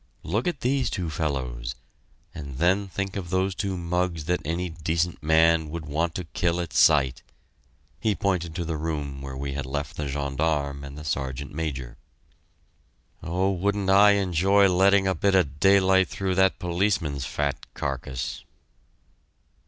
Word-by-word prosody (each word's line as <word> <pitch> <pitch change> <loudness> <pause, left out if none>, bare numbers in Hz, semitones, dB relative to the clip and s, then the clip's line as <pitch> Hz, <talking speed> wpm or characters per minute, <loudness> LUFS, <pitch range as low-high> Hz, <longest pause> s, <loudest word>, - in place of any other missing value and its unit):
"Look 105 - -1
at 175 -6 -2
these 130 +1 +1
two 85 -4 -3
fellows 65 -6 -3 0.6
and 70 -4 -7
then 95 +5 +2
think 95 +1 -4
of 95 -4 -5
those 95 +1 +1
two 95 0 -3
mugs 85 -2 -1
that 90 +1 0
any 85 +4 -2
decent 80 +1 -2
man 80 0 +3
would 80 0 -5
want 80 +3 -1
to 90 - -3
kill 85 +1 -1
at 85 -2 -4
sight!" 70 -4 +4 0.8
He 110 -3 +1
pointed 90 -4 -1
to 85 -2 -2
the 80 -1 -2
room 75 -3 -4
where 65 -1 -6
we 70 0 -4
had 70 -2 -4
left 70 +2 -4
the 75 - -3
gendarme 70 0 -1
and 70 +1 -9
the 75 - -8
Sergeant 70 -2 -3
Major. 70 -6 -4 1.2
"Oh 95 +3 0
wouldn't 100 +1 0
I 100 +1 +7
enjoy 100 +1 +3
letting 95 +2 +4
a 95 - +2
bit 100 +1 +1
of 75 -6 +1
daylight 95 -1 +5
through 95 +1 -2
that 95 0 +3
policeman's 85 -6 -1
fat 70 -1 -3
carcass!" 65 -2 -4
85 Hz, 155 wpm, -25 LUFS, 70-95 Hz, 1.2 s, I